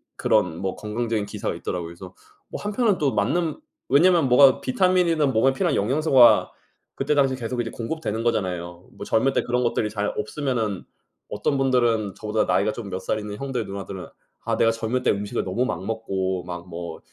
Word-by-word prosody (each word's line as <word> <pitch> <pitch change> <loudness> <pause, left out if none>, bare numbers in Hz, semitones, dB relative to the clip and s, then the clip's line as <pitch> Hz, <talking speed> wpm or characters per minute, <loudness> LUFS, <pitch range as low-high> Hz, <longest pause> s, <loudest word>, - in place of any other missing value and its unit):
그런 80 - +1
뭐 95 -1 -3
건강적인 110 0 -2
기사가 100 - -4
있더라고요. 85 -2 -4
그래서 90 +1 -11 0.4
한편은 205 -1 0
또 140 -3 +1
맞는 170 - 0 0.3
왜냐하면 165 -1 +4
뭐가 130 +1 +6
비타민이나 175 0 +2
몸에 135 0 +3
필요한 170 +1 0
영양소가 130 +2 +4 0.4
그때 145 +2 0
당시에 135 -2 +3
계속 120 0 -4
이제 115 -1 -2
공급되는 115 -3 -4
거잖아요. 90 -6 -2
뭐 - - -9
젊을 135 +5 +2
때 - - +1
그런 125 +1 0
것들이 115 -2 0
잘 105 -1 -2
없으면은 110 -4 -2 0.5
어떤 140 - 0
분들은 120 -6 +1
저보다 110 0 -1
나이가 110 - +2
좀 110 -2 -7
몇 95 0 -4
살 110 +3 -2
있는 105 -1 -6
형들, 130 -3 -3
누나들은 95 -1 -7 0.4
아 - - 0
내가 115 - +4
젊을 115 +3 -2
때 - - +3
음식을 100 0 -2
너무 105 +7 -1
막 95 -7 -3
먹고 95 -5 -2
막 90 0 -7
뭐 85 -1 -7
115 Hz, 395 characters per minute, -24 LUFS, 100-135 Hz, 0.5 s, 뭐가